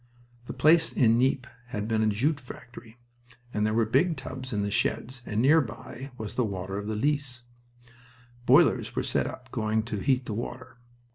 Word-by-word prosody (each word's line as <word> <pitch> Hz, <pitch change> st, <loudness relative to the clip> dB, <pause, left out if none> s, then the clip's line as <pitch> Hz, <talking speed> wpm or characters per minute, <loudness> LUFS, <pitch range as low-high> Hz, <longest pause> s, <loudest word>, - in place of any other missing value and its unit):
The -, -, -6 dB
place 160 Hz, +2 st, +4 dB
in 115 Hz, -2 st, +4 dB
Nieppe 130 Hz, 0 st, +2 dB, 0.2 s
had 105 Hz, -4 st, -4 dB
been 110 Hz, -1 st, +1 dB
a 110 Hz, -, +3 dB
jute 135 Hz, +9 st, +1 dB
factory, 120 Hz, -2 st, -12 dB, 0.6 s
and 105 Hz, 0 st, +1 dB
there 110 Hz, -, 0 dB
were 115 Hz, -1 st, +3 dB
big 165 Hz, +9 st, +2 dB
tubs 130 Hz, 0 st, -6 dB
in 105 Hz, -3 st, 0 dB
the 100 Hz, -, -2 dB
sheds, 125 Hz, +4 st, -1 dB
and 105 Hz, -, -1 dB
nearby 130 Hz, -3 st, +1 dB
was 110 Hz, -2 st, -6 dB
the 125 Hz, -, +1 dB
water 95 Hz, -2 st, -3 dB
of 105 Hz, -, -6 dB
the 110 Hz, -, -2 dB
Lys. 135 Hz, 0 st, -1 dB, 1.0 s
Boilers -, -, +4 dB
were -, -, 0 dB
set -, -, -2 dB
going 110 Hz, 0 st, 0 dB
to 110 Hz, -2 st, -4 dB
heat 130 Hz, +3 st, +1 dB
the 110 Hz, -, -4 dB
water. 120 Hz, +2 st, -6 dB
120 Hz, 180 wpm, -27 LUFS, 110-130 Hz, 1.0 s, place